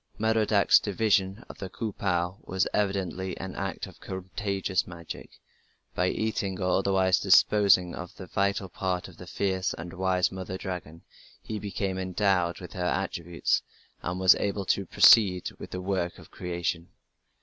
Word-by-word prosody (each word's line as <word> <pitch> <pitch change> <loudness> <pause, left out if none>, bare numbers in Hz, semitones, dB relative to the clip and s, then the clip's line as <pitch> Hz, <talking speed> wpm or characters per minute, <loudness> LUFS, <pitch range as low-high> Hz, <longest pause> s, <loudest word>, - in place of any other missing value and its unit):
Merodach's 110 -2 +4
division 100 0 0
of - - -12
the 95 - -5
"Ku 105 +3 -4
pu" 90 -2 0
was 95 -1 0
evidently 95 -2 -1
an 95 -1 -6
act 95 -1 -3
of - - -14
contagious 95 0 -2
magic; 85 -2 -9 0.5
by 90 - +1
eating 100 -4 -2
or 90 -1 +2
otherwise 95 -1 +3
disposing 95 -2 +5
of 90 -1 -8
the 95 - -9
vital 100 +1 0
part 90 0 -3
of 95 - -15
the 90 - -11
fierce 95 0 -1
and 85 0 -8
wise 95 -1 +1
mother 95 0 -5
dragon, 85 -4 -6 0.4
he 110 - -4
became 100 -2 -3
endowed 95 -2 +1
with 90 - -9
her 90 -3 -3
attributes, 85 -2 0 0.4
and 90 +1 -3
was 95 -1 +7
able 100 -1 -2
to 100 0 0
proceed 95 -3 +6
with - - -8
the 90 - -5
work 90 -2 -1
of - - -15
creation. 85 -1 -3
95 Hz, 155 wpm, -28 LUFS, 90-100 Hz, 0.5 s, was